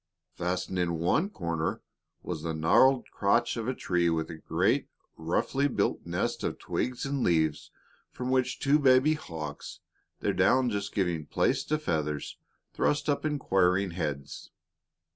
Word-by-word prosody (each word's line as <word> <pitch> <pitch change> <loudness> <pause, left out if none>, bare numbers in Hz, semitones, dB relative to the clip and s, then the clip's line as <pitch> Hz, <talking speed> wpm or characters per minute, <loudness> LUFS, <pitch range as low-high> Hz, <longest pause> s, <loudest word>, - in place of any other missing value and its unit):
Fastened 90 +1 -2
in 85 -2 0
one 140 - +1
corner 85 - -3 0.4
was 85 -4 -4
the 80 0 -3
gnarled 125 +12 +4
crotch 115 +4 +1
of 115 -1 -4
a 130 - -1
tree 90 -5 +1
with 80 0 -1
a 80 - -8
great, - - +1 0.3
roughly 90 - 0
built 140 - -1
nest - - -2
of - - -2
twigs 125 +1 -3
and 140 -1 -2
leaves 80 -5 +1 0.4
from 125 +1 -4
which 130 -1 +1
two 145 +2 +3
baby 135 +2 +5
hawks, 80 - -7 0.4
their - - 0
down 130 -2 +3
just 100 -1 -3
giving 85 -6 -1
place - - +1
to 155 - 0
feathers, 75 - -2 0.4
thrust 150 +1 0
up 145 - +1
inquiring 95 - +2
heads. 75 -5 -5
95 Hz, 145 wpm, -29 LUFS, 80-130 Hz, 0.4 s, baby